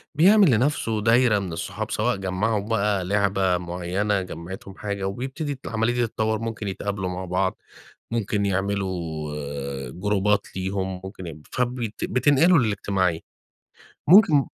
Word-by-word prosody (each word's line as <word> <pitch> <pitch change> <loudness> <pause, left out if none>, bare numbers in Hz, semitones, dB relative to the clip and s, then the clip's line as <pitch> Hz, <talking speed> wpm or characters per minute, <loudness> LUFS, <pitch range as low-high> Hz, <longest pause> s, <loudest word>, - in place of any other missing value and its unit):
بيعمل 190 0 +6
لنفسه 115 -3 +1
دايرة 115 -1 +4
من 90 -4 -5
الصحاب، 80 - -4
سواء - - +1
جمّعهُم 100 +3 -1
بقى 105 -4 +1
لعبة 95 -2 +2
مُعينة، 90 +4 -1
جمعِتهم 95 +2 -8
حاجة، 100 -2 -4
وبيبتدي 135 +8 -4
ت 130 - -20
العملية 115 +1 0
دي 120 -1 +1
تتطوّر، 110 0 -1
ممكن 115 -2 -4
يتقابلوا 95 -1 -3
مع 90 +1 -4
بعض، 95 +2 0 0.5
ممكن 105 -3 0
يعملوا 95 -1 -1 0.9
جروبات 105 +4 +1
ليهم 95 0 -2
ممكن 95 -2 -8
يب 75 -2 -10
فبت 120 -3 -2
بتنقلوا 145 +7 +4
للاجتماعية. 100 -7 0 0.9
ممكن 165 -6 +7
100 Hz, 130 wpm, -24 LUFS, 95-115 Hz, 0.9 s, ممكن